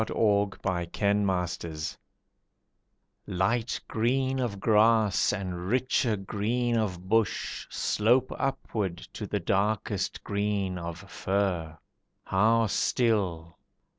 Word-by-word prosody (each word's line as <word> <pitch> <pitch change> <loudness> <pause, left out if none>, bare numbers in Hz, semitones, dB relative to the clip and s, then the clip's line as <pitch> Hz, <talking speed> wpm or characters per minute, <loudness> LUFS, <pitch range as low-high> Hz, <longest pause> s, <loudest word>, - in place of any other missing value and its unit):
THE - - -5 0.8
GUNS - - -9
IN 100 0 +2
SUSSEX 85 -4 -3 1.3
Light 115 +6 0
green 130 +4 0
of 115 -6 -2
grass 110 0 +4
and 90 -3 -4
richer 125 -1 +1
green 115 +5 -1
of 95 -5 -2
bush 110 +1 0
Slope 120 +5 +2
upwards 105 -9 -2
to - - -5
the - - -1
darkest 100 0 -1
green 100 -3 -1
of 85 -1 -5
fir. 90 -5 -1 0.5
How 115 +4 +3
still! 95 -7 0
105 Hz, 100 wpm, -28 LUFS, 95-115 Hz, 1.3 s, grass